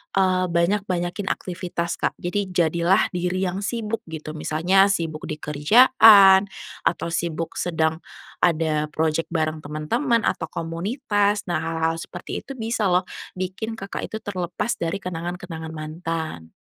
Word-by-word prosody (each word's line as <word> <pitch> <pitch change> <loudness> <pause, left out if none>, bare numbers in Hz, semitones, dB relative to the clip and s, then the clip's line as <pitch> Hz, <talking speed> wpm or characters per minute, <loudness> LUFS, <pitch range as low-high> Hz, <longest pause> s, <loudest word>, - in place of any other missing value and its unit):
eee, 185 -1 +2
banyak-banyakin 180 +1 0
aktivitas 175 -2 -3
Kak, - - 0
jadi 195 +3 -2
jadilah 170 +1 +2
diri 180 +1 -1
yang 185 +1 -1
sibuk 225 +1 -2
gitu 155 -1 -6
misalnya 165 +6 +3
sibuk 165 -5 -2
di 155 - -3
kerjaan 200 - +6 0.4
atau 170 0 -1
sibuk 165 -1 -3
sedang 160 -2 0 0.4
ada 155 -3 +1
projek 160 +1 -1
bareng 155 -2 -1
teman-teman 220 - 0
atau 165 - -1
komunitas 205 - -1
nah 175 -3 -1
hal-hal 165 0 -1
seperti - - -6
itu 275 - -9
bisa 225 -3 -1
loh 180 +1 +3 0.3
bikin 190 +5 -4
Kakak 195 -2 -5
itu 220 - -7
terlepas 180 +2 -3
dari 165 +1 -1
kenangan-kenangan 170 -2 -5
mantan. 155 - -5
175 Hz, 130 wpm, -23 LUFS, 160-195 Hz, 0.4 s, kerjaan